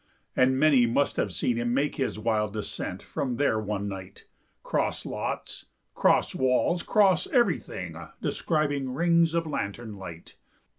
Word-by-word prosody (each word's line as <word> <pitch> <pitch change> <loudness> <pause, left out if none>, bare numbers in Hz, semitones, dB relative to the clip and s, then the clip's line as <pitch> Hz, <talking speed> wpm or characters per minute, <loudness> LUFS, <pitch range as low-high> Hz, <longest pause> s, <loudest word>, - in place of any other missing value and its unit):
And 130 +1 +3
many 140 -5 +5
must 140 +5 +1
have 100 - 0
seen 115 +7 0
him 120 +1 0
make 140 +2 0
His 135 - -1
wild 110 -2 0
descent 105 -1 -5
from 125 -4 -3
there 130 -6 +2
one 105 -1 -3
night, 95 -1 -8 0.4
'Cross - - -1
lots, - - -5 0.3
'cross - - +3
walls, 130 +7 +2
'cross 195 -4 +3
everything, 240 -3 0 0.2
Describing 145 -5 -1
rings 170 +1 +3
of 165 -1 +1
lantern 115 -6 -4
light. 85 -4 -10
130 Hz, 140 wpm, -27 LUFS, 105-155 Hz, 0.4 s, many